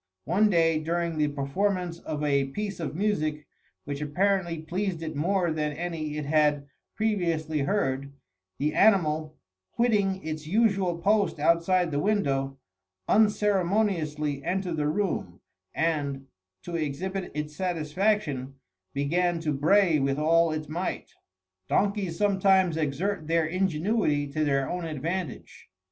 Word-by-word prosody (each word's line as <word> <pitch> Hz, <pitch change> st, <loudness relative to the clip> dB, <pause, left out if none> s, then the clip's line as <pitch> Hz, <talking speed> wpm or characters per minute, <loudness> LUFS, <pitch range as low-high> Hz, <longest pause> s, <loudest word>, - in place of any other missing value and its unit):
One 205 Hz, +7 st, +3 dB
day, 165 Hz, -4 st, +3 dB
during 165 Hz, 0 st, -2 dB
the 150 Hz, -, +3 dB
performance 170 Hz, +5 st, -1 dB
of 150 Hz, -3 st, -4 dB
a 140 Hz, -2 st, +2 dB
piece 200 Hz, +9 st, -5 dB
of 160 Hz, -2 st, -4 dB
music 155 Hz, -6 st, -1 dB, 0.4 s
which 140 Hz, 0 st, -4 dB
apparently 175 Hz, +3 st, 0 dB
pleased 175 Hz, +1 st, -3 dB
it 155 Hz, -1 st, -5 dB
more 175 Hz, +3 st, +1 dB
than 150 Hz, -1 st, -1 dB
any 155 Hz, -2 st, -4 dB
it 150 Hz, -, -3 dB
had 150 Hz, -1 st, +2 dB, 0.3 s
previously 170 Hz, -8 st, 0 dB
heard, 140 Hz, -4 st, -1 dB, 0.5 s
the 150 Hz, +2 st, 0 dB
animal, 155 Hz, -7 st, +3 dB, 0.4 s
quitting 200 Hz, -6 st, +1 dB
its 155 Hz, -1 st, -5 dB
usual 195 Hz, -3 st, +2 dB
post 200 Hz, +3 st, +2 dB
outside 170 Hz, +3 st, +2 dB
the 145 Hz, -, 0 dB
window, 135 Hz, -9 st, 0 dB, 0.5 s
unceremoniously 190 Hz, -8 st, +1 dB
entered 180 Hz, -1 st, -2 dB
the 150 Hz, -1 st, 0 dB
room, 155 Hz, -, -2 dB, 0.3 s
and, 145 Hz, -4 st, -1 dB, 0.4 s
to 175 Hz, -, -5 dB
exhibit 175 Hz, +5 st, -3 dB
its 150 Hz, 0 st, -4 dB
satisfaction, 165 Hz, -5 st, -1 dB, 0.4 s
began 170 Hz, +5 st, +1 dB
to 155 Hz, -2 st, -1 dB
bray 165 Hz, +3 st, +4 dB
with 135 Hz, 0 st, 0 dB
all 165 Hz, +2 st, +3 dB
its 155 Hz, -1 st, -4 dB
might. 170 Hz, +5 st, -4 dB, 0.6 s
Donkeys 200 Hz, -4 st, 0 dB
sometimes 190 Hz, -3 st, +3 dB
exert 160 Hz, +3 st, -2 dB
their 165 Hz, 0 st, +2 dB
ingenuity 175 Hz, -2 st, 0 dB
to 155 Hz, +2 st, -1 dB
their 135 Hz, -2 st, +1 dB
own 180 Hz, 0 st, -3 dB
advantage. 165 Hz, 0 st, -5 dB
165 Hz, 125 wpm, -27 LUFS, 150-190 Hz, 0.6 s, bray